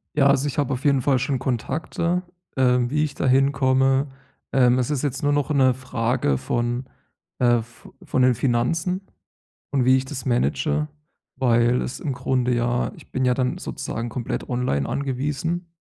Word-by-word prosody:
Ja, 140 -2 +4
also, 140 0 +3
ich 145 - -4
habe 140 -2 +1
auf 130 - -6
jeden 140 -2 +4
Fall 130 0 +2
schon 135 +1 -1
Kontakte, 160 +8 -1 0.3
äh, 125 -1 +4
wie 150 +3 +1
ich 145 -2 -4
da - - -2
hinkomme. 135 +1 +3 0.4
Ähm, 125 -1 +4
es 125 +1 -1
ist 145 -4 -1
jetzt 140 -1 -2
nur 145 0 +2
noch 145 0 0
'ne 130 -3 +4
Frage 120 - -1
von, 120 - -2 0.5
äh, 120 -2 +4
vo 120 +1 -17
von 130 - -1
den 125 -1 +5
Finanzen 140 - 0 0.7
und 135 -3 +1
wie 130 0 +6
ich 130 - 0
das 130 -2 -7
manage. 150 +5 0 0.5
Weil 120 -1 +3
es 125 - -5
im 140 - -2
Grunde 125 0 0
ja 120 +1 0
ich - - -16
bin 130 - 0
ja 125 - +3
dann 125 0 -1
sozusagen 115 +1 -5
komplett 120 +1 -4
online 120 - -1
angewiesen 150 +6 -2
130 Hz, 175 wpm, -23 LUFS, 125-140 Hz, 0.7 s, wie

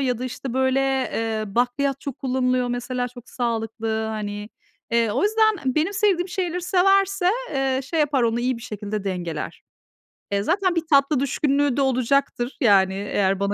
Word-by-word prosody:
ya 250 -4 0
da, 255 - -4
işte, 255 0 -5
böyle, 260 0 +2
eee, 225 -5 -1
bakliyat 265 +3 0
çok 280 -3 -6
kullanılıyor 255 -1 0
mesela 245 +1 -2
çok 245 0 -14
sağlıklı, 225 -2 -2
hani. 210 -1 -4 0.4
Eee, 230 -2 +2
o - - 0
yüzden 425 - +2
benim 320 +6 +1
sevdiğim 380 -3 +1
şeyleri 355 -1 -2
severse, 390 +1 +3 0.2
eee, 270 -1 +1
şey 325 +3 -1
yapar, 290 -3 +2
onu 230 0 +1
iyi 250 0 0
bir 230 - -11
şekilde 210 -2 -5
dengeler. 175 -5 -4 0.7
E, 200 0 +1
zaten 365 - +1
bir 335 - +2
tatlı 275 0 +4
düşkünlüğü 280 0 +1
de - - +2
olacaktır, 265 0 0
yani, 195 -5 +5
eğer 195 -1 0
bana 200 0 0
255 Hz, 165 wpm, -23 LUFS, 225-285 Hz, 0.7 s, yani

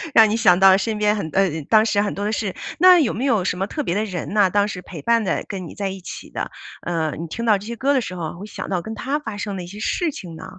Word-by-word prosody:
让 220 -1 +8
你 220 - 0
想 180 -5 +5
到 190 0 +7
身 215 +2 -2
边 210 0 +2
很 200 -7 -3
呃， 195 -1 +3 0.2
当 220 0 +5
时 205 -2 +2
很 205 - -1
多 200 - -4
的 210 - 0
事。 210 -4 -2 0.2
那 365 0 +8
有 290 -9 +2
没 250 - -2
有 225 -9 +2
什 180 - -1
么 195 - -1
特 300 - -3
别 175 - -1
的 210 +2 0
人 185 -2 -5
呢？ 205 -3 +4
当 205 +1 +2
时 180 -3 -6
陪 170 -3 -9
伴 230 +7 +3
的、 - - -1
跟 185 -4 -5
你 - - -11
在 200 -2 -2
一 190 0 -6
起 180 - -9
的， - - -4 0.3
呃， 160 -3 -1
你 165 - -5
听 230 +8 -5
到 215 -3 +4
这 205 +3 -10
些 235 - -4
歌 275 +4 +1
的 265 - +3
时 185 -6 -5
候 170 -1 -5
会 200 - -7
想 210 - -7
到 185 -3 -1
跟 220 +5 -7
他 275 +7 -2
发 220 -8 -6
生 205 -1 -4
的 180 - -5
一 175 - -9
些 205 +3 -10
事 330 +8 0
情 170 -10 -9
呢？ - - -9
205 Hz, 335 characters per minute, -21 LUFS, 185-225 Hz, 0.3 s, 让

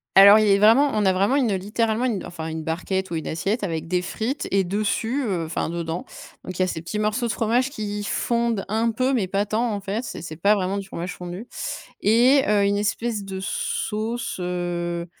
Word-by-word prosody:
Alors, 200 +2 +10
il 215 -1 +3
est 200 0 +5
vraiment 235 +8 +6
on 210 -1 +1
a 190 - +4
vraiment 200 +8 +2
une, 245 -8 +2
littéralement, 220 +5 0
une, 220 -7 -1
enfin, 165 -2 -6
une 160 0 -4
barquette 190 +4 -2
ou 170 - -3
une 160 - -4
assiette, 200 +8 -1
avec 165 -4 -3
des 180 +1 0
frites 235 +9 -3
et 195 0 +3
dessus, 215 +7 -1
heu, 175 -5 -1
enfin, 160 0 -2
dedans, 170 0 -4 0.4
donc, 185 -1 -6
il - - +2
y - - +5
a - - +1
ces 165 -3 -4
petits 210 +5 -3
morceaux 215 +3 0
de 235 - 0
fromage 240 +5 +1
qui 210 -4 -4
fondent 235 -1 0
un 225 +3 +1
peu 255 +4 0
mais 220 -7 +1
pas 200 +2 0
tant, 225 +3 0
en 205 - -2
fait, 205 +4 -3
c'est - - -6
c'est 155 -1 -7
pas 200 +6 +3
vraiment 195 -1 -1
du 200 - -4
fromage 180 -1 -5
fondu. 180 +6 -7 0.5
Et, 245 +6 +5
heu, 210 -1 +3
une 200 0 +2
espèce 210 +1 -1
de 190 -1 -6
sauce, 220 +4 -2
heu 175 -1 -2
205 Hz, 220 wpm, -23 LUFS, 180-225 Hz, 0.5 s, Alors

